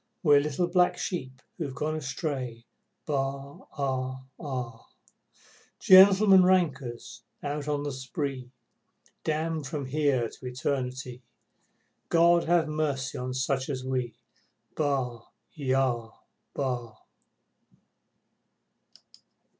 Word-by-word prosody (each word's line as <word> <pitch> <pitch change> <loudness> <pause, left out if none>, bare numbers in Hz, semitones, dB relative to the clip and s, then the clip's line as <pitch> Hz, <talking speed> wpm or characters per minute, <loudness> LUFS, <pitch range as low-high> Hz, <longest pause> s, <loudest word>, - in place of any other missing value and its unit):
We're 145 -3 +6
little 150 +4 0
black 180 0 +3
sheep 130 -8 -5 0.2
who've 140 -5 -4
gone 155 +4 -2
astray, 135 -5 -4 0.4
Baa 140 -1 -3 0.2
aa 130 -1 -2 0.2
aa! 125 -6 -5 0.9
Gentlemen 190 0 +8
rankers 150 -11 0 0.2
out 145 0 -3
on 145 -1 -1
the 145 - -3
spree, 130 0 -4 0.7
Damned 155 -1 -1
from 145 -1 -4
here 135 -3 +1
to 130 - -13
Eternity, 125 -1 -3 0.9
God 170 0 +5
ha' 170 -1 +3
mercy 150 -4 -2
on 125 0 -4
such 130 +1 -1
as 130 -3 -3
we, 125 -2 -2 0.6
Baa! 135 -5 -1 0.3
Yah! 130 -5 0 0.5
Bah! 120 -5 -3
140 Hz, 95 wpm, -28 LUFS, 130-155 Hz, 0.9 s, Gentlemen